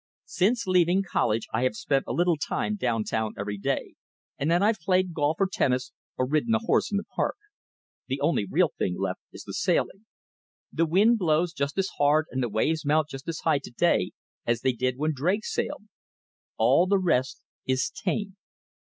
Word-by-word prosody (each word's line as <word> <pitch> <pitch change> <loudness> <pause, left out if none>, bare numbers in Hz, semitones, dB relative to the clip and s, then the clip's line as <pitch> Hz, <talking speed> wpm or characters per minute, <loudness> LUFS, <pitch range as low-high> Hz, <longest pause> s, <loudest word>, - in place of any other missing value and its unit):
Since 230 +5 +1
leaving 185 +1 +3
college 115 -8 0
I 110 - +1
have 130 -4 +1
spent 135 +4 0
a - - -3
little 175 0 +2
time 185 +7 -2
down 115 - 0
town 110 0 -2
every 100 0 -4
day; - - -2 0.5
and 145 - 0
then 175 +3 +3
I've 215 0 +2
played 185 +1 +1
golf 150 0 0
or 195 - +4
tennis 130 -8 0 0.3
or 130 - +1
ridden 155 - +1
a - - +4
horse 230 - +1
in 200 - 0
the 200 - -2
park. - - -2 0.7
The - - -2
only - - +1
real - - +2
thing - - -1
left - - -2
is - - -10
the - - -8
sailing. 210 +3 0 0.7
The 165 +1 +1
wind 210 +8 +4
blows 170 -1 +1
just 140 0 -3
as 195 0 +1
hard 150 +2 +4
and 130 - -2
the 120 - -1
waves 155 +10 0
mount 155 +1 +2
just 135 0 -9
as 165 -1 -4
high 155 -3 +2
to 140 - -10
day 120 - +1 0.3
as 120 -1 0
they 130 - +2
did 125 +1 -1
when 155 +2 0
Drake 180 +10 0
sailed. - - -3 0.7
All 175 - +4
the 200 +1 +3
rest 135 -9 0 0.2
is 130 0 +1
tame. 200 -2 -3
155 Hz, 195 wpm, -26 LUFS, 130-185 Hz, 0.7 s, or